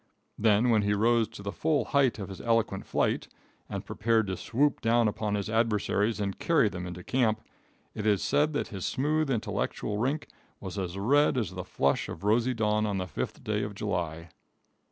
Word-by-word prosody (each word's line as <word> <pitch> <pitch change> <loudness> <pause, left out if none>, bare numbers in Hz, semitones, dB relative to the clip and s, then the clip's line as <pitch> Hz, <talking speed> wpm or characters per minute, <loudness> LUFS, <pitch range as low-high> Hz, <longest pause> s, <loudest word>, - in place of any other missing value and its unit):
Then, 110 +2 +3
when 110 -2 +4
he 105 0 +1
rose 115 +1 +3
to 100 - -11
the 100 - -3
full 155 +4 0
height 135 -5 +2
of 100 -3 -6
his 95 - -8
eloquent 115 -4 0
flight, - - 0 0.4
and - - -5
prepared 115 0 +1
to 95 -1 -3
swoop 140 +9 0
down 115 0 +3
upon 105 0 -1
his 100 -1 -2
adversaries 110 -1 +1
and 100 -2 -3
carry 145 -10 +3
them 90 -2 -6
into 90 0 -7
camp, 110 -2 +1 0.5
it 110 -1 -3
is 100 -3 +3
said 150 +2 +2
that 145 - -2
his 95 -3 -6
smooth 155 +2 0
intellectual 105 -3 -2
rink 135 +6 -1 0.3
was 95 +1 -5
as 90 0 -4
red 135 +8 +3
as 110 -6 -1
the 90 0 -5
flush 70 -4 0
of - - -7
rosy 120 +4 +2
dawn 105 -1 +1
on 100 -2 -1
the 95 - -2
5th - - -5
day 105 -1 -1
of 105 -1 -4
July. 85 -5 -3
105 Hz, 195 wpm, -29 LUFS, 100-120 Hz, 0.5 s, when